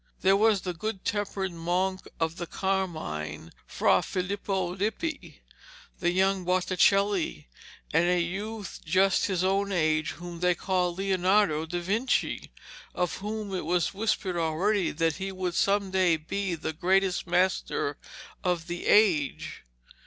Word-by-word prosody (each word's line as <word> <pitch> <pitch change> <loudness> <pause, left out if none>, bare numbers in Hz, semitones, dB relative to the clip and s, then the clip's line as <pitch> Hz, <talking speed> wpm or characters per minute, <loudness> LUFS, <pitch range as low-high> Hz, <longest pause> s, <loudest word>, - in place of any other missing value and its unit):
There 190 +1 +5
was 210 -1 +3
the 180 -1 -3
good 195 +2 -5
tempered 200 -2 -2
monk 180 +3 -1
of 165 +1 -1
the 175 - -5
Carmine, 155 - -3 0.2
Fra - - +3
Filipo 190 -1 -2
Lippi, 220 - -3 0.6
the 175 - +1
young 190 +1 +2
Botticelli, 185 - +2 0.5
and 175 +1 +4
a 180 0 +3
youth 200 +4 -4
just 190 +3 +3
his 185 -2 0
own 195 +1 +1
age 155 -3 +1
whom 175 -1 -8
they 180 0 +2
called 180 -1 0
Leonardo 190 -4 +2
da 175 +2 -2
Vinci, 215 +9 -1 0.4
of 180 -2 -1
whom 210 0 -5
it 185 - -2
was 175 +2 +1
whispered 195 -3 -1
already 170 +4 +1
that 165 0 0
he 195 +1 -4
would 185 -2 -3
some 200 +1 +1
day 185 -3 +3
be 185 +4 -3
the 160 0 -4
greatest 185 +3 +1
master 180 +2 0 0.4
of 175 -3 0
the 175 0 -5
age. 175 - +2
185 Hz, 140 wpm, -28 LUFS, 170-195 Hz, 0.6 s, There